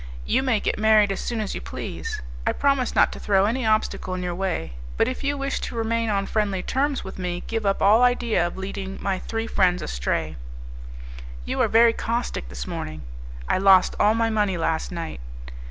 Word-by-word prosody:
You - - +2
may 255 -5 +1
get - - -2
married 215 -2 +5
as 195 - -3
soon 235 -2 -3
as 210 - -3
you - - -5
please; - - -6 0.2
I - - +3
promise 275 -3 +1
not - - +5
to - - -8
throw 195 -1 +3
any 230 +2 0
obstacle 215 -3 0
in 180 - -4
your 175 -1 -2
way; 175 - -3 0.2
but - - +3
if 255 - -4
you 285 +1 0
wish 275 0 -2
to - - -5
remain 230 0 0
on 200 -1 0
friendly 200 -3 -1
terms 275 +1 0
with 190 - -8
me 180 -1 -3
give 225 -2 -2
up 195 - +1
all 215 +4 +6
idea 240 -7 +2
of 175 - -8
leading 190 0 -5
my 190 -2 -1
three 225 0 -3
friends 185 -5 +2
astray." 60 +5 -2 1.1
"You - - -1
are - - +4
very 230 +1 +5
caustic 230 - -3
this - - -6
morning." 75 -1 -6 0.4
"I - - +1
lost 190 -1 +5
all 215 +1 +4
my 225 0 +1
money 205 -4 +1
last 165 +1 -1
night. 165 - -5
205 Hz, 200 wpm, -24 LUFS, 180-230 Hz, 1.1 s, all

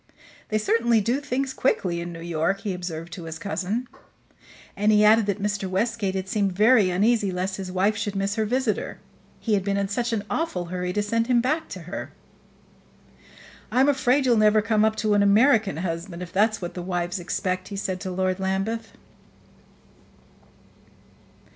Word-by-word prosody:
"They 215 - +1
certainly 230 +2 +2
do 235 +6 0
things 270 -1 -2
quickly 180 -10 0
in 175 0 -5
New 165 -1 -8
York," 170 +4 -1
he 200 - -2
observed 175 -2 -6
to 175 - -7
his 160 0 -6
cousin; 200 +7 -3 0.9
and 210 +2 +2
he 210 0 +5
added 220 0 +5
that 200 0 -1
Mr. 205 -1 -2
Westgate 200 0 -1
had 190 0 -3
seemed 195 -1 0
very 210 0 +5
uneasy 205 +3 +2
lest 185 +1 -2
his 190 -2 -5
wife 195 +3 +1
should 205 0 -3
miss 195 +1 0
her 220 0 0
visitor 250 -2 -1 0.4
he 225 - -1
had 195 -2 +2
been 200 0 0
in 200 -1 -1
such 240 +4 -1
an 220 -3 -1
awful 215 - -2
hurry 180 0 -2
to 210 +3 0
send 230 +2 0
him 250 -2 +4
back 305 +7 -1
to - - -7
her. - - -7 1.6
"I'm 260 +3 +4
afraid 270 -1 +2
you'll 240 -3 +4
never 215 0 +4
come 215 -1 +2
up 220 0 +2
to 215 -1 +1
an 205 - +4
American 210 - +4
husband, 170 +1 -4
if 175 0 -10
that's 215 0 +2
what 175 - -4
the 180 - -5
wives 175 +1 -2
expect," 185 +1 -2
he 200 - -7
said 190 -2 -3
to 185 - -5
Lord 185 +1 -1
Lambeth. 195 +4 -2
200 Hz, 180 wpm, -24 LUFS, 185-225 Hz, 1.6 s, he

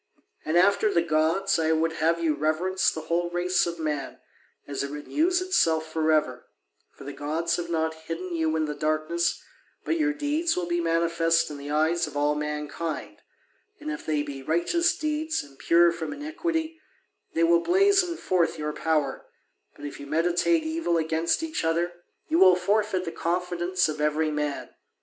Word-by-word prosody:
And 160 +2 0
after 200 +3 +4
the 170 - +2
gods, 165 +4 +1
I 160 0 +2
would 160 +1 +1
have 165 +1 +1
you 165 -2 +1
reverence 160 +6 +1
the 160 - -5
whole 170 +2 -1
race 175 +1 +1
of 170 0 -4
man, 150 -4 -3 0.5
as 140 -1 -3
it 140 - -3
renews 315 - 0
itself 165 - +2
for 160 -1 +1
ever; 150 -5 0 0.4
for - - -14
the 140 +1 -7
gods 165 +3 -1
have 170 -1 -4
not 160 -1 0
hidden 165 +3 -6
you 160 -1 0
in 160 -1 +1
the 150 - -3
darkness, 155 +3 -1 0.4
but 330 - 0
your 305 -1 +2
deeds 300 +3 -1
will 180 - -1
be 175 0 -1
manifest 165 -1 +1
in 145 - -7
the 140 +1 -8
eyes 160 +3 +1
of 145 - -7
all 145 +1 +2
mankind, 150 +2 -4 0.6
and 305 0 -5
if 320 - -6
they 150 -2 0
be 140 -2 -7
righteous 175 - +1
deeds 310 - -1
and 140 -2 -17
pure 170 0 +5
from 165 - -5
iniquity, 320 +2 -3 0.5
they 165 - +2
will 170 0 +4
blazon 375 - +3
forth 180 - 0
your 150 0 -3
power: 150 -4 -1 0.5
but 145 - -10
if 145 - -7
you 140 - -9
meditate 175 - +2
evil 315 - 0
against 165 - 0
each 320 - -3
other, 170 +2 0 0.3
you 165 - +2
will 185 -1 +7
forfeit 195 0 0
the 165 - -4
confidence 175 +1 -1
of 155 -1 -4
every 155 +1 +1
man. 150 -1 -3
165 Hz, 175 wpm, -26 LUFS, 155-185 Hz, 0.6 s, will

